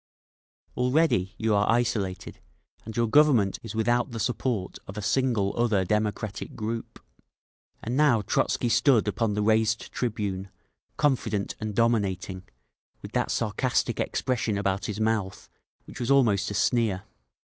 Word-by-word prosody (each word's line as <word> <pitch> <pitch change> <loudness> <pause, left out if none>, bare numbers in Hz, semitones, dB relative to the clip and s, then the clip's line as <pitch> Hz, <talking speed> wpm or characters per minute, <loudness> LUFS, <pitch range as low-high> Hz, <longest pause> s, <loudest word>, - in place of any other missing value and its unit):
Already 125 - +1
you 110 -1 +1
are 100 0 +2
isolated, 110 -6 -1 0.5
and 110 0 -7
your 120 - +3
Government 115 -5 +4
is 115 -1 -8
without 120 +3 +1
the 115 -2 -6
support 120 -4 -2
of 95 - -9
a - - -3
single 115 -3 +1
other 110 -5 +1
democratic 105 +1 -2
group…. 115 0 -5 0.8
And 120 +3 -2
now 135 -7 +3
Trotzky 120 - 0
stood 120 -2 +3
upon 105 0 0
the 105 - 0
raised 110 +1 +1
tribune, 100 -5 -3 0.5
confident 115 -8 0
and 110 -1 -4
dominating, 100 -5 0 0.5
with - - -8
that - - 0
sarcastic - - 0
expression 120 -5 -1
about 100 -1 -1
his 105 0 -4
mouth 110 -3 -2 0.3
which - - -11
was 120 0 -2
almost 115 -8 +3
a 105 - -4
sneer. 110 -3 +1
110 Hz, 135 wpm, -26 LUFS, 100-120 Hz, 0.8 s, Government